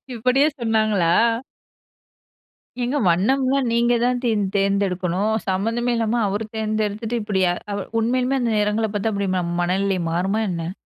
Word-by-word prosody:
இப்டியே 255 +5 +3
சொன்னாங்களா? 215 -7 +2 1.7
ஏங்க 250 +4 0
வண்ணம்லாம் 260 +9 +2
நீங்க 235 +1 +2
தான் 245 0 +1
தேர் 225 -3 +1 0.2
தேர்ந்தெடுக்கணும். 195 0 0
சம்மந்தமே 225 +6 0
இல்லாம 230 +1 0
அவர் 205 +3 -2
தேர்ந்தெடுத்துட்டு 215 +1 -2
இப்டி, 205 -2 -1 0.6
உண்மையிலுமே 255 +3 +1
அந்த 240 -2 0
நெறங்கள 210 +1 +1
பார்த்தா 215 +2 0
அப்டி 200 -1 -1
ம 180 - 0 0.2
மனநிலை 190 +1 0
மாறுமா 190 +5 0
என்ன? 170 0 -4
215 Hz, 120 wpm, -22 LUFS, 195-240 Hz, 1.7 s, இப்டியே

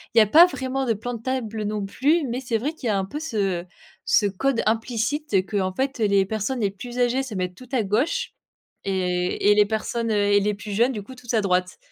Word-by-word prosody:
Il - - 0
y 225 - +10
a - - +6
pas 325 - +8
vraiment 270 -5 -3
de 230 - +2
plan 245 +4 -5
de 230 - -6
table 230 -4 -3
non 210 -1 -2
plus, 290 +10 +1
mais 240 +2 -2
c'est 240 -3 -1
vrai 280 +8 -2
qu'il 280 -7 -6
y - - +1
a 205 - +2
un 190 - -1
peu 290 +9 -6
ce 195 - -1 0.4
ce - - +3
code 230 +6 0
implicite 230 +4 -1
qu'en 190 -3 -1
fait 265 +1 -2
les 200 -2 +3
personnes 220 +5 -2
les 200 -2 +1
plus 240 +5 -9
âgées 245 +2 +2
se 250 -6 -6
mettent 180 -1 -3
tout 255 +2 -14
à 245 -5 +1
gauche 270 - 0 0.5
et 180 +1 +1
et 205 - +5
les 210 -1 +5
personnes, 225 +1 -2
heu - - +1
et 205 0 +4
les 205 0 0
plus 205 +1 -8
jeunes, 240 +6 +2
du 205 -3 -5
coup, 260 - -11
tout 250 -1 -16
à 220 - +3
droite. 180 -2 0
220 Hz, 245 wpm, -24 LUFS, 200-255 Hz, 0.5 s, y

